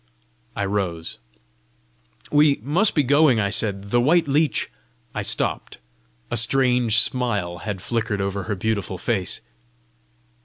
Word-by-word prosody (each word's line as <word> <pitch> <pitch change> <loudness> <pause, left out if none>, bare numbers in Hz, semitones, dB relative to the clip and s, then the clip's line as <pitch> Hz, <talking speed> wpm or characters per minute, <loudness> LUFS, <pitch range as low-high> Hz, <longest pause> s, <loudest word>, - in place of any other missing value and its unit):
I 100 - -1
rose. 90 -8 -3 1.1
"We 145 -1 +4
must 175 - +1
be 150 - +3
going!" 140 -2 +4
I 100 -2 0
said. 100 -1 -1
"The 120 - +3
white 160 +5 +3
leech 145 -4 +1 0.2
" - - -39
I - - -3
stopped: - - -1 0.5
a - - 0
strange 125 -1 +3
smile 105 -11 0
had 100 -3 -5
flickered 115 -3 -2
over 100 0 -3
her 105 - -2
beautiful 100 -1 -2
face. 95 0 -2
110 Hz, 130 wpm, -22 LUFS, 100-135 Hz, 1.1 s, We